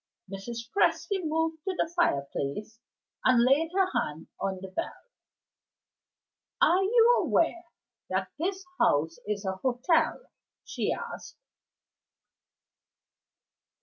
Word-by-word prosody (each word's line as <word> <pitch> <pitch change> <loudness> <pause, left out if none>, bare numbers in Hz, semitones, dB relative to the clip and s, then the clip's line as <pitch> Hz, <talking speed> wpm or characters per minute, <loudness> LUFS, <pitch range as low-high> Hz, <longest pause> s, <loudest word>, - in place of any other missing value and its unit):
Mrs. 230 +4 -6
Presty 400 -1 +2
moved 320 0 -1
to 380 -1 -2
the 335 - 0
fireplace, 210 - -1 0.4
and 250 -2 +5
laid 280 +6 +3
her 385 -1 +4
hand 150 +2 -2
on 190 -1 -2
the 190 0 -8
bell. 330 - -4 1.6
"Are 365 +2 +5
you 465 +4 +5
aware 340 +1 +1 0.4
that - - -1
this 380 +3 -2
house 160 +3 +2
is 210 -1 -2
a 190 0 -2
hotel?" 260 - +1 0.5
she - - -2
asked. 475 0 -6
270 Hz, 105 wpm, -28 LUFS, -, 1.6 s, and